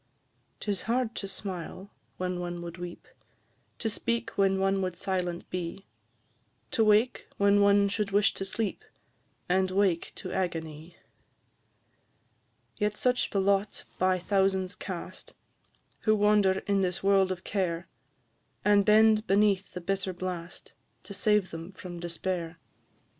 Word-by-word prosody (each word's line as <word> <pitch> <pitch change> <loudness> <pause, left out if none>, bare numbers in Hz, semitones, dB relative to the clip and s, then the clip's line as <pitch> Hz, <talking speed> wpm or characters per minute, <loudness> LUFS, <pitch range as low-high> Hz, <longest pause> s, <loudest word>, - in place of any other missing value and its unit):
'Tis 200 -3 -2
hard 240 -1 +1
to 195 - -5
smile 190 0 -6 0.3
when 180 -1 -2
one 175 -1 -4
would 170 0 -8
weep, 175 0 -8 0.7
To 225 - -2
speak 235 +2 -1
when 195 -1 +2
one 195 0 +1
would 185 -2 -2
silent 180 -1 -2
be; 180 +2 -4 0.9
To 225 - +3
wake 215 +4 +3
when 200 0 +4
one 200 0 +5
should 205 0 -1
wish 200 +1 +3
to - - -3
sleep, 200 +2 -3 0.6
And 185 +1 +2
wake 185 -3 +1
to 185 - -6
agony. 165 -2 -4 1.8
Yet 210 0 0
such 250 0 +1
the 200 - 0
lot 200 +1 +1 0.2
by 185 0 +3
thousands 190 0 +1
cast, 185 -1 -7 0.6
Who 215 -1 +3
wander 205 -2 +3
in 200 -1 +2
this 180 -1 -1
world 195 -1 +4
of 180 -1 -4
care, 175 -4 -2 0.8
And 205 -1 +5
bend 215 +1 +5
beneath 200 0 +3
the 180 - -4
bitter 195 +1 -2
blast, 175 -1 -6 0.3
To 200 - -9
save 210 -2 +2
them 165 +3 -7
from 180 -2 -8
despair. 170 0 -3
195 Hz, 135 wpm, -29 LUFS, 180-205 Hz, 1.8 s, one